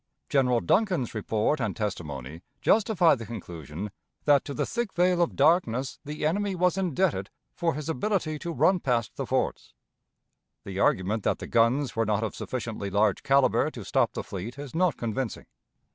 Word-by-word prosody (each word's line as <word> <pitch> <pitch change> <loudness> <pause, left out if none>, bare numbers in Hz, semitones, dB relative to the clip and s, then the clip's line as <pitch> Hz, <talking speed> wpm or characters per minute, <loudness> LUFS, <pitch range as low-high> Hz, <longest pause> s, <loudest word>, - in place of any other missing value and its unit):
General 125 -4 +3
Duncan's 175 - +1
report 110 +5 0
and 110 -6 -1
testimony 80 - -4 0.2
justify 205 -6 +4
the 115 -4 -4
conclusion 90 - -7 0.3
that 145 -2 +5
to 140 - -5
the - - 0
thick 235 -4 -2
veil 180 0 +3
of 170 - +1
darkness 135 -7 +2
the 150 0 -4
enemy 195 +4 0
was 180 0 +2
indebted 180 - 0 0.2
for 165 -4 0
his 150 0 -5
ability 160 0 -1
to 170 - -4
run 185 +3 +3
past 120 -7 -1
the - - -4
forts. - - -2 0.9
The 95 -1 -5
argument 100 +3 +2
that - - 0
the - - -7
guns 120 +4 +2
were 115 -1 +1
not 105 0 +1
of 110 - -2
sufficiently 115 -5 -4
large 100 0 +2
caliber 135 -1 +3
to - - -9
stop - - +1
the - - -4
fleet 105 +6 -6
is 140 -2 -8
not 175 +1 +2
convincing. 120 +1 -3
130 Hz, 170 wpm, -27 LUFS, 105-170 Hz, 0.9 s, that